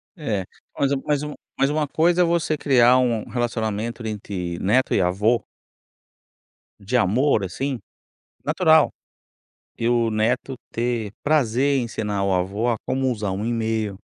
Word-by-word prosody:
É, 110 - -2 0.3
mas 140 -1 +2
mas 145 -1 +1
uma, 150 0 -5 0.2
mas 135 - +3
uma 150 0 0
coisa 170 +4 +2
é - - +6
você 165 -2 +1
criar 130 -3 +5
um 120 -4 +1
relacionamento 115 -1 -2
entre 95 -5 -4
neto 125 +7 +2
e - - +3
avô 105 +6 +2 1.4
de 105 +5 -3
amor 120 +2 +3
assim, 130 +8 -3 0.7
natural - - +4 0.9
e 115 - 0
o 120 -1 +2
neto 120 +5 0 0.2
ter 115 -3 -2
prazer 140 -2 +2
em 125 - 0
ensinar 105 -3 -2
o 100 -1 +1
avô 95 +6 -1
a 115 - 0
como 130 0 0
usar 105 -4 -2
um 100 +4 -3
e-mail 110 -4 -1
115 Hz, 145 wpm, -23 LUFS, 105-135 Hz, 1.4 s, é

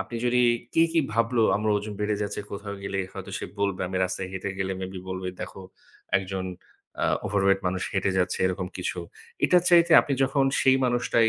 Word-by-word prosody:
আপনি 120 - -5
যদি 125 0 +3 0.3
কে 165 - +5
কি 165 - +4
ভাবলো, 115 +1 +2
আমার 110 +1 0
ওজন 105 0 -4
বেড়ে 105 0 0
যাচ্ছে, 100 - -3
কোথাও 100 0 -6
গেলে 100 0 -3
হয়তো - - -8
সে - - -5 0.2
বলবে, 100 -2 0
আমি 95 - -3
রাস্তায় 95 0 -3
হেঁটে 95 +1 -3
গেলে 95 0 -1
মেইবি 95 0 -5
বলবে 95 0 -4
দেখো, 95 - -7 0.5
একজন 95 -1 -3 0.6
আ - - +3 0.2
ওভারওয়েট 95 -1 +2
মানুষ 95 +1 -1
হেঁটে 100 -1 +1
যাচ্ছে, 90 0 0
এরকম 90 0 -2
কিছু। 90 0 -3 0.5
এটার 180 -1 +5
চাইতে 170 -1 +6
আপনি 140 - -3
যখন 135 +1 +2 0.2
সেই 130 0 +5
মানুষটাই 120 -2 +2
100 Hz, 185 wpm, -26 LUFS, 95-120 Hz, 0.6 s, চাইতে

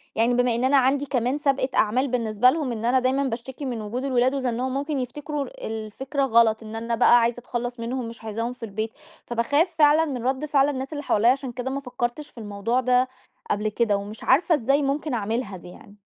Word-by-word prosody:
يعني 230 +2 +3
بما 245 -1 +2
إن 235 - -1
أنا 270 +2 +4
عندي 270 +2 +2
كمان 255 0 0
سابقة 275 -3 +1
أعمال 250 +6 +2
بالنسبة 235 -1 +3
لهم 295 -3 -1
إن 230 -1 -4
أنا 255 +2 +4
دايمًا 260 +2 +1
باشتكي 260 +2 -5
من 240 -4 -3
وجود 225 +5 -4
الولاد 255 -1 +2
وزنّهم، 255 0 -1
ممكن 285 0 -2
يفتكروا 290 +3 -4 0.2
الفكرة 225 +6 -3
غلط، 225 -3 +3
إن 220 0 -8
أنا 230 +1 -2
بقى 240 +1 +6
عايزة 235 +1 0
أتخلص 245 0 -4
منهم، 240 +1 -3
مش 230 0 -10
عايزاهم 230 +3 -3
في 250 - -14
البيت، 220 +1 -3 0.3
فباخاف 285 +9 +1
فعلًا 310 +1 +5
من 255 -6 -4
رد 265 +3 0
فعل 285 -1 +3
الناس 270 +1 -4
اللي 290 -1 -5
حواليّا، 230 -2 +4
عشان 265 -1 -2
كده 250 +2 -4
ما 275 - -2
فكرتش 250 +2 -4
في - - -27
الموضوع 215 +3 -1
ده 250 0 +3 0.4
قبل 210 +1 0
كده، 215 -1 +1
ومش 205 +2 -8
عارفة 335 +2 +4
إزاي 275 +2 +2
ممكن 285 +1 -1
أعملها 220 -2 -2
دي 175 - -12
يعني. 200 +3 -15
250 Hz, 210 wpm, -24 LUFS, 230-275 Hz, 0.4 s, بقى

